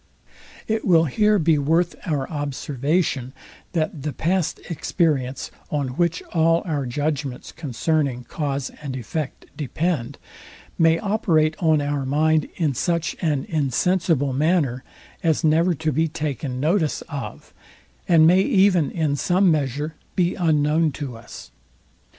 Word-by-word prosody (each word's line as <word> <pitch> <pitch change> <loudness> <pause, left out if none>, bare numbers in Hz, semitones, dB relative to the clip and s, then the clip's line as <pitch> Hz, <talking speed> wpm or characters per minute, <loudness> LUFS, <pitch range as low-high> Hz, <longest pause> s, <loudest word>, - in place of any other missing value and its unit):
It 220 0 -1
will 165 -5 +4
here 210 - +3
be 160 -4 +3
worth 165 +5 +2
our 145 -5 -1
observation, 145 -1 -1 0.4
that 155 -3 -1
the 150 +2 -2
past 175 +4 0
experience, 145 -6 -1 0.2
on 145 -3 -1
which 170 +6 0
all 165 0 +3
our 145 -6 -2
judgments 145 0 -3
concerning 145 -3 -1
cause 140 0 -3
and 140 -3 -5
effect 135 +4 -5
depend, 150 -3 -2 0.6
may 165 0 +5
operate 165 -6 +1
on 160 -3 +3
our 145 -1 -1
mind 155 +3 +2
in 155 -5 0
such 170 +4 -1
an 150 -6 0
insensible 155 0 +1
manner 145 -3 +1 0.4
as 160 -1 +1
never 165 +3 +3
to 155 +1 -1
be 160 +4 +1
taken 145 -4 -4
notice 155 +2 +1
of, 145 -3 -8 0.5
and 165 -2 +6
may 180 +3 +6
even 190 - +3
in 155 -4 0
some 180 +5 +3
measure 150 +1 -1 0.2
be 175 -1 +2
unknown 155 -1 +2
to 130 -3 -6
us. 65 - -11
155 Hz, 130 wpm, -23 LUFS, 140-170 Hz, 0.6 s, and